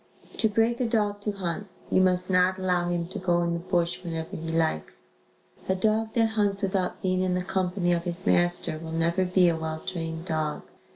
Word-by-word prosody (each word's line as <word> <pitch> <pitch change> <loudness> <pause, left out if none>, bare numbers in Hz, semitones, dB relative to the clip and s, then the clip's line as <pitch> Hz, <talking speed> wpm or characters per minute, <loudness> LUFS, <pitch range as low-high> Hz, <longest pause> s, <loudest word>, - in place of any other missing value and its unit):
To 220 - +3
break 225 +3 +2
a 250 - +1
dog 210 -3 0
to 210 - -1
hunt, 195 0 -3 0.2
you 185 - +5
must 180 -1 +3
not 185 0 +3
allow 180 -2 +1
him 175 -1 -1
to - - -5
go 175 -2 +2
in 170 0 0
the 170 - -1
bush 175 0 -1
whenever 165 -2 -4
he 165 0 -4
likes. 160 - -1 0.6
A 190 - +3
dog 220 +3 0
that 225 -2 +3
hunts 205 -2 0
without 190 -2 -1
being 185 -1 +1
in 185 -1 +1
the 180 - -1
company 180 -1 0
of 170 0 -1
his 175 +1 -4
master 175 -2 +2
will 160 0 -7
never 170 +3 +1
be 180 0 +4
a 170 - +3
well 160 0 -3
trained 165 -2 -4
dog. 155 -3 -2
180 Hz, 210 wpm, -27 LUFS, 170-195 Hz, 0.6 s, you